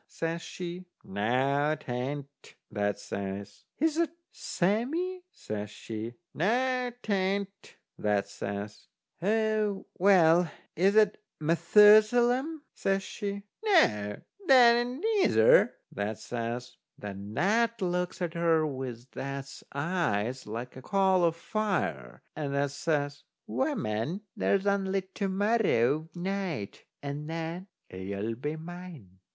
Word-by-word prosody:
says 165 +1 -3
she. 180 +1 -7 0.2
"Noo, 135 +9 +1
'tain't," 140 0 -6 0.2
that 105 -1 0
says. 100 0 -6
"Is 315 +1 +1
that 335 -1 +2 0.2
Sammee?" 290 - -1
says 105 - -6
she. 110 +2 -6 0.2
"Noo, 250 +7 +1
'tain't," 200 0 -2 0.2
that 105 -1 +1
says. 100 +1 -6 0.3
"A 215 +1 +2 0.3
well, 175 -3 +5 0.3
is 195 +5 +3
that 215 -1 +4 0.2
Methusalem?" 215 - +5
says 195 0 0
she. 200 0 -5 0.2
"Noo, 105 - +3 0.3
'tain't - - -15
that 240 -2 +7
neither," 435 - +4 0.2
that 105 +1 -3
says. 120 +2 -5 0.2
Then 100 +1 -7
that 230 +4 +2
looks 180 -1 -1
at 170 -2 -2
her 165 -2 +3
with 130 -4 -5
that's 135 0 -6
eyes 135 - -1
like 115 +4 -6
a 130 - -9
coal 190 +1 +3
o' 165 - +4
fire, 165 - -2
and 140 -2 -3
that 140 0 +1
says: 145 -1 -1 0.2
"Woman, 115 - -1
there's 200 0 +1
only 195 -1 +1
to 200 - -1
morrow 190 - +2
night, 180 - -3 0.2
and 145 +2 -5
then 165 +3 -4 0.2
you'll 100 +4 -4
be 145 +7 -4
mine!" 160 - -10
165 Hz, 110 wpm, -29 LUFS, 120-200 Hz, 0.3 s, that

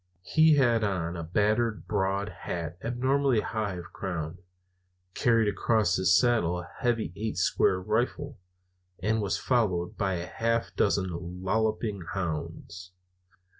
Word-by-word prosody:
He 155 - +5
had 120 -5 +3
on 90 -4 -1
a 85 - -4
battered 105 +6 0
broad 100 0 0
hat 85 -5 -5
abnormally 130 0 +1
high 105 -4 -2
of 85 -1 -9
crown, 85 -3 -4 0.7
carried 115 -2 +3
across 105 -2 +2
his 90 -2 +4
saddle 110 -9 +2
a 90 - -10
heavy 115 - 0
"eight 110 -3 -3
square" 90 0 +2
rifle, 120 +7 -2 0.6
and 110 +5 0
was 100 -2 0
followed 95 -9 0
by 95 -3 0
a 85 0 -4
half 115 +4 -1
dozen 90 -2 -1
lolloping 110 0 0
hounds. 90 +1 -5
100 Hz, 130 wpm, -28 LUFS, 90-115 Hz, 0.7 s, He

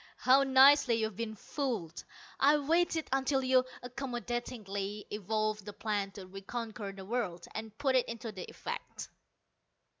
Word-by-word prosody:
How 260 +2 +5
nicely 270 -1 +6
you've 220 -2 -1
been 220 0 -4
fooled! 215 - -3 0.4
I 290 +2 +6
waited 325 +2 +1
until 270 0 +1
you 255 0 +4 0.2
accommodatingly 240 -5 -4
evolved 215 +1 -1
the 205 +1 -8
plan 205 -2 -1
to 195 -2 -9
reconquer 200 +2 -5
the 195 -1 -10
world, 195 -6 -2
and 220 -1 -6
put 270 -2 +1
it 255 - +3
into 230 -1 -5 0.2
effect. - - -6
230 Hz, 130 wpm, -32 LUFS, 205-265 Hz, 0.4 s, nicely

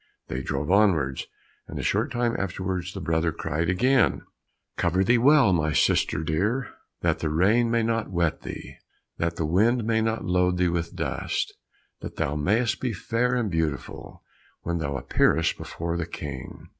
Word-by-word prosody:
They 65 - -3
drove 70 +5 -2
onwards, 85 -10 +2 0.4
and - - -7
a - - -3
short 115 +8 0
time 120 -2 0
afterwards, 95 -1 -3
the - - -4
brother 80 -1 0
again 80 - -8 0.3
cried, 125 +8 +3 0.6
"Cover 90 +2 +1
thee 120 +5 +3
well, 135 -5 +5
my 80 -3 +1
sister - - +2
dear, 105 - -1 0.3
That - - +1
the 80 - -1
rain 105 +10 +3
may 115 0 +2
not 115 -1 -1
wet 85 -4 0
thee, - - -8 0.4
That 85 0 -1
the 80 - -1
wind 110 +9 +2
may 110 0 +2
not 110 0 -1
load 90 0 +2
thee 90 0 +2
with 85 -1 -3
dust, - - -2 0.5
That - - -8
thou 70 - -1
may'st 105 +10 +1
be 125 -3 -1
fair 120 +6 0
and 115 -5 -1
beautiful 80 -3 -3 0.4
When 85 0 -2
thou 70 -3 -2
appearest 80 +4 +2
before 85 +1 -4
the 85 -2 -3
King." 70 -6 -8
90 Hz, 170 wpm, -25 LUFS, 80-115 Hz, 0.6 s, well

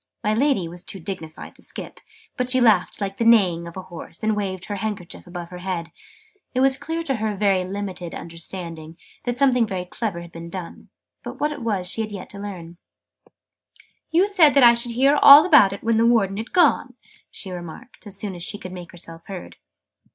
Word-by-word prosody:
My 210 - +1
Lady 250 - +1
was 175 +2 -6
too 195 - -8
dignified 160 -3 -7
to - - -18
skip, - - -7 0.4
but 250 0 -1
she 255 0 +4
laughed 220 -7 +3
like 195 -1 -4
the - - 0
neighing 185 -7 +4
of 170 - -10
a 190 - -6
horse, 175 0 -11
and 215 0 +1
waved 190 -3 -3
her 205 - -4
handkerchief 195 -4 -5
above 175 -1 -7
her 180 - -9
head: 180 -2 -4 0.6
it - - +2
was 265 0 +4
clear 325 +4 -4
to 270 -6 -1
her 215 -1 -2
very 195 -2 +2
limited 185 -2 -5
understanding 165 -1 -7 0.3
that 245 0 -2
something 250 -4 +3
very 185 -3 -4
clever 185 -2 -4
had 170 0 -11
been 165 0 -9
done, 175 -1 -8 0.3
but - - -8
what 300 +1 0
it 290 -3 -7
was 205 -6 -1
she 190 +5 -2
had 215 -1 -4
yet 195 -3 -6
to 200 - -9
learn. 175 -4 -8 1.3
"You 345 +4 +4
said 350 -9 +5
I 240 -3 +8
should 235 0 -2
hear 275 +4 +3
all 285 +3 +10
about 290 - +6
it 200 - -7
when 225 0 +2
the 230 +1 +4
Warden 200 -5 +2
had 225 +3 -6
gone," 290 -7 +3 0.3
she 190 - -9
remarked, 180 +7 -10
as 200 -1 -4
soon 200 -1 -4
as 175 - -9
she 205 - -3
could 185 -3 -9
make 180 -2 -9
herself 165 -1 -9
heard. 190 -3 -8
200 Hz, 210 wpm, -23 LUFS, 180-235 Hz, 1.3 s, all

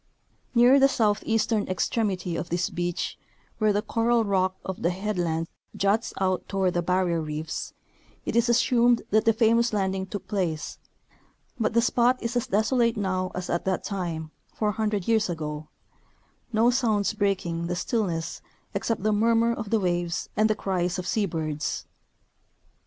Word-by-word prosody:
Near 245 +4 +7
the 275 - +7
south 215 -6 +1
eastern 225 -1 +1
extremity 185 -1 -1
of 170 - -4
this 175 0 -1
beach, 175 0 -3 0.4
where 215 -1 +3
the 205 +1 0
coral 230 0 +2
rock 190 -2 +1
of 190 - -5
the 170 - +2
head 195 +2 -2
land 165 -1 -1 0.3
juts 200 +3 +1
out 185 -1 0
toward 190 -2 0
the 175 - +1
barrier 180 -1 +1
reefs, 155 +1 -4 0.5
it - - -2
is 235 +1 +3
assumed 240 0 +3
that 215 +1 +3
the 225 - +6
famous 230 +1 +3
landing 190 -2 -1
took 200 0 -6
place; 175 -7 -2 0.8
but 220 0 0
the 235 - +4
spot 245 +1 +3
is 235 +1 -3
as 245 - 0
desolate 230 +3 +2
now 185 -2 -1
as 180 -1 -4
at 170 - -1
that 190 -2 0
time, 170 -6 -4 0.2
four 210 -1 +1
hundred 210 -3 -1
years 220 -3 +2
ago, 155 -2 -4 0.8
no 230 +2 +4
sounds 220 -5 +1
breaking 185 -5 -1
the 175 - -2
stillness 180 -4 -2 0.3
except 230 -4 -2
the 215 0 +2
murmur 230 +2 +3
of 220 -3 -5
the 225 - +2
waves 175 -2 -1
and 215 +1 +3
the 215 - +2
cries 180 -3 -1
of 185 - -4
sea 210 0 0
birds. 155 -3 -3
200 Hz, 165 wpm, -26 LUFS, 175-225 Hz, 0.8 s, Near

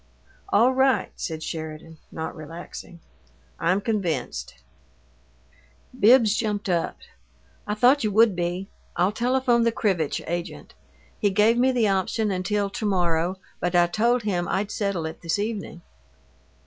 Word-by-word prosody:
"All 260 -9 +4
right," 265 0 +2
said 160 -1 -5
Sheridan, 160 0 -7
not 160 0 -5
relaxing. 165 +2 -10 0.6
"I'm 180 +4 +2
convinced." 160 - -2 1.4
Bibbs 225 -1 +6
jumped 210 -3 -2
up. 170 -2 0 0.7
"I 210 - -1
thought 255 +6 +4
you 215 - +1
would 220 -1 +4
be. 175 +2 -2 0.3
I'll 180 +3 +2
telephone 245 +1 +2
the 230 0 +3
Krivitch 190 -9 0
agent. 175 +1 -5 0.5
He 205 - +2
gave 210 +4 +3
me 260 +1 +4
the 240 -4 +2
option 200 +2 0
until 200 +2 0
to 215 - -4
morrow, 175 -2 +1 0.2
but 175 0 -1
I 175 0 +6
told 230 +6 +1
him 180 -4 -1
I'd 205 +1 -1
settle 200 -6 -2
it 160 0 -7
this 165 +2 -1
evening." 205 -4 -4
200 Hz, 135 wpm, -24 LUFS, 170-225 Hz, 1.4 s, Bibbs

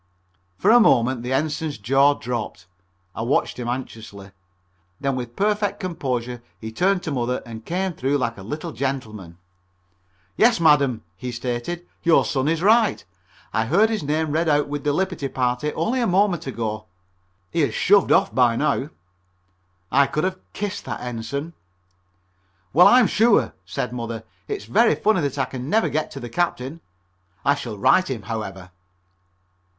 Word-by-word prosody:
For 95 - +3
a 240 - +8
moment 125 - +3
the 125 +2 -5
Ensign's 150 +1 -1
jaw 135 +7 +3
dropped. 110 -7 -5 0.5
I - - -5
watched 125 +2 0
him 120 - -4
anxiously. 110 -5 -6 0.7
Then 135 -1 -1
with 120 -2 -6
perfect 205 0 0
composure 125 - -3 0.2
he 110 0 -7
turned 180 - +1
to 160 - -3
Mother 125 -1 -1
and 115 -1 -9
came 185 +6 -2
through 140 0 0
like 115 -3 -2
a 100 - -11
little 155 - -5
gentleman. 110 - -4 1.0
"Yes, 230 -2 +4
madam," 140 -8 +3
he 125 +7 -6
stated, 120 +8 -4 0.2
"your 170 -1 +4
son 135 0 -1
is 165 +2 0
right. 220 +1 +3 0.5
I 110 - +1
heard 205 - +3
his 220 - -1
name 155 +1 -1
read 160 +2 +1
out 145 -1 +2
with 145 0 -4
the 145 - +1
liberty 180 -2 -1
party 125 +3 -1
only 230 +11 0
a 235 - +1
moment 185 -4 +1
ago. 110 -4 -4 0.6
He - - -1
has 145 - 0
shoved 200 0 +4
off 195 - +3
by 125 -2 +3
now." 145 +1 0 1.0
I 140 +1 +4
could 155 +2 -2
have 185 0 -1
kissed 205 0 -4
that - - -5
Ensign. 125 +7 -5 1.2
"Well, 175 +6 +8
I'm 250 -1 +6
sure," 225 +2 +3
said 125 -1 -3
Mother, 115 -2 -5 0.2
"it's 415 -2 -4
very 230 +3 +3
funny 215 -4 +2
that 140 -1 -2
I 135 - +1
can 130 +1 -7
never 220 +4 +2
get 155 0 -1
to 140 - -8
the 120 - -6
Captain. 155 +1 -2 0.6
I 140 - +5
shall 120 -7 -6
write 185 - +3
him, 120 -6 -4
however." 95 -4 -6
140 Hz, 165 wpm, -22 LUFS, 120-175 Hz, 1.2 s, a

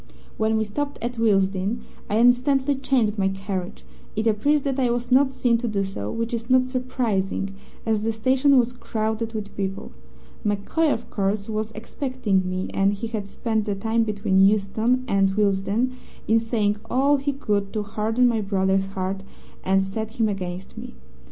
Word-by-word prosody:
"When 220 0 +1
we 220 - +2
stopped 285 +7 -3
at 240 0 -3
Willesden, 200 0 +1 0.3
I 210 - +1
instantly 260 +4 +4
changed 250 -6 +1
my 190 - +3
carriage. 190 -1 -4 0.3
It 215 +1 -1
appears 270 +7 +2
that 275 -1 -1
I 250 -2 +2
was 240 +1 -2
not 265 +2 +5
seen 245 -3 +1
to 240 - -2
do 200 -3 0
so, 150 - -4
which 230 +1 -3
is 230 +1 -3
not 255 0 +5
surprising, 235 -7 -1 0.3
as 220 -2 +1
the 225 +1 0
station 260 +5 +3
was 245 0 +2
crowded 220 -1 -3
with 205 -2 -5
people. 195 -1 -4 0.5
MacCoy, 210 +10 +1
of 235 - -3
course, 200 0 -1
was 215 0 -2
expecting 215 -4 -1
me, 185 0 -2
and 195 +1 +2
he 200 - -5
had 215 -3 -4
spent 220 -1 -1
the 205 -2 -1
time 225 +3 0
between 205 -3 +1
Euston 215 +5 +2
and 195 -2 +2
Willesden 205 +4 +1 0.4
in 225 +1 +4
saying 220 -2 0
all 275 +3 +3
he 280 +1 -1
could 205 -7 -1
to 215 -2 -1
harden 220 +4 +1
my 230 -2 +1
brother's 195 -1 +1
heart 195 0 -3 0.4
and 195 +1 +3
set 220 +3 -4
him 225 -2 +1
against 185 -2 -5
me. - - -9
220 Hz, 175 wpm, -24 LUFS, 195-245 Hz, 0.5 s, not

